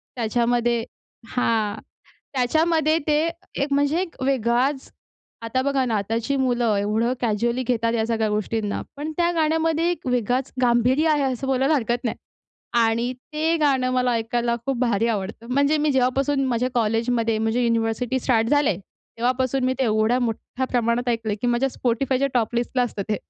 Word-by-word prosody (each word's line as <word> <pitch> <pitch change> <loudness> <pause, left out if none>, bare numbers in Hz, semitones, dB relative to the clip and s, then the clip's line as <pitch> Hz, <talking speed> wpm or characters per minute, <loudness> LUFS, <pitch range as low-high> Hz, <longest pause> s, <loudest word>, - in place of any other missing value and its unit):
त्याच्यामध्ये 235 0 +1 0.5
हां, 220 -3 0 0.5
त्याच्यामध्ये 315 +4 +2
ते 300 -1 +3 0.5
एक 280 0 -2
म्हणजे 285 +4 +2
एक 340 -7 -6
वेगळाच. 260 +1 0 0.5
आता 230 +3 -1
बघा 275 -1 +1
ना, 230 -4 0
आताची 225 +7 -1
मुलं 245 -5 +1
एवढं 215 +4 0
कॅज्युअली 235 +2 0
घेतात 230 -2 +1
या 225 -1 +1
सगळ्या 225 -1 0
गोष्टींना. 210 0 -2 0.2
पण 295 +2 -4
त्या 345 0 +2
गाण्यामध्ये 325 +1 +1
एक 350 - -5
वेगळाच 250 +1 0
गांभीर्य 250 +6 +3
आहे 300 -2 +2
असं 265 -1 -2
बोलायला 270 +3 +2
हरकत 240 -2 -1
नाही. 230 - -1 0.7
आणि 230 +2 +1 0.2
ते 320 +2 +1
गाणं 270 -5 +2
मला 250 -1 +1
ऐकायला 235 +1 0
खूप 270 - 0
भारी 230 -3 +1
आवडतं. 215 +1 -3
म्हणजे 280 +3 +3
मी 300 0 +1
जेव्हापासून 270 +2 +1
माझ्या 250 0 0
कॉलेजमध्ये, 230 0 +1
म्हणजे 225 +3 0
युनिव्हर्सिटी 230 +2 0
स्टार्ट 230 -3 +2
झाले. 290 -9 +2
तेव्हापासून 255 +6 -2
मी 255 - +2
ते 265 - +2
एवढ्या 220 +2 +2
मोठ्या 245 +2 -3
प्रमाणात 240 0 0
ऐकलंय 225 -3 -1
की - - +1
माझ्या 240 +2 +2
Spotifyच्या 260 +3 +1
टॉप 235 -1 0
लिस्टला 245 +1 0
असतं 220 -4 -3
ते. 210 - +2
245 Hz, 155 wpm, -23 LUFS, 230-270 Hz, 0.7 s, ते